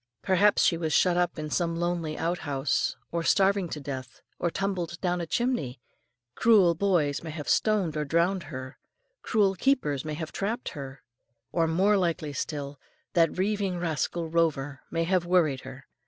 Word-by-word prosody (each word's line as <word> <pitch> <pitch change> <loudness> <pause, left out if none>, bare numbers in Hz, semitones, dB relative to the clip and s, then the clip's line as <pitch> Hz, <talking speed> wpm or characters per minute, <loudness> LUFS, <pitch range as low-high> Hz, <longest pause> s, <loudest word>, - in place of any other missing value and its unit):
Perhaps 200 +2 +4
she 170 - +3
was 160 -2 -2
shut 180 -2 +4
up 175 -1 0
in 155 -1 -5
some 170 0 0
lonely 170 -2 -2
outhouse 150 -5 -1 0.2
and 170 -1 0
starving 195 0 +3
to 155 - -5
death; 130 -3 -7 0.2
or 170 - +1
tumbled 175 -2 -3
down 180 -1 0
a 170 - -4
chimney; 200 - -1 0.5
cruel 200 - +5
boys 165 -6 +1
may 165 - -7
have 155 -2 -6
stoned 205 -7 +2
her 150 - -2
or - - -2
drowned 170 +5 +1
her; 130 -2 -7 0.4
cruel 205 -4 +2
keepers 185 - +1
may 155 -1 -4
have 160 0 -5
trapped 220 +5 -3
her, 135 -3 -8 0.5
or, 165 -2 +2
more 195 +6 +3
likely 165 -5 -1
still, 140 -1 -4 0.3
that 165 -1 +3
rieving 195 -1 0
rascal 165 0 -2
Rover 145 -5 0
may 165 0 0
have 175 0 +1
worried 160 -7 +2
her. 130 0 -10
170 Hz, 170 wpm, -27 LUFS, 150-185 Hz, 0.5 s, cruel